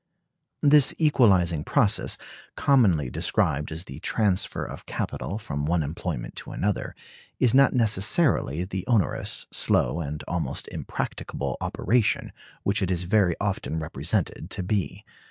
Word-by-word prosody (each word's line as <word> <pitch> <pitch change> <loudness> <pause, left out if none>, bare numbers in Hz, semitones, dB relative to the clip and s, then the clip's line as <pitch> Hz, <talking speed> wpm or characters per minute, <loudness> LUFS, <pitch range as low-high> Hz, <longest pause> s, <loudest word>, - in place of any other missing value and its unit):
This 145 -1 +5
equalizing 95 - +3
process, - - +2 0.4
commonly 95 - +3
described 75 +2 0
as 80 +2 -4
the 70 -5 -10
transfer 100 +1 0
of - - -9
capital 80 - -3
from 75 -9 -4
one 85 -1 +1
employment 70 -5 -5
to - - -7
another, 105 0 -2 0.4
is 125 -3 +4
not 135 0 +5
necessarily 110 - +2
the 90 0 -4
onerous, 115 -7 +1
slow, 85 - +2
and 75 -2 -4
almost - - -2
impracticable 65 -3 -4
operation 115 +2 0 0.3
which 100 +1 0
it 95 - 0
is 90 -1 0
very 90 -2 +2
often 95 -5 -2
represented 80 +1 -2
to 95 - -3
be. 100 +1 -2
95 Hz, 130 wpm, -25 LUFS, 80-110 Hz, 0.4 s, This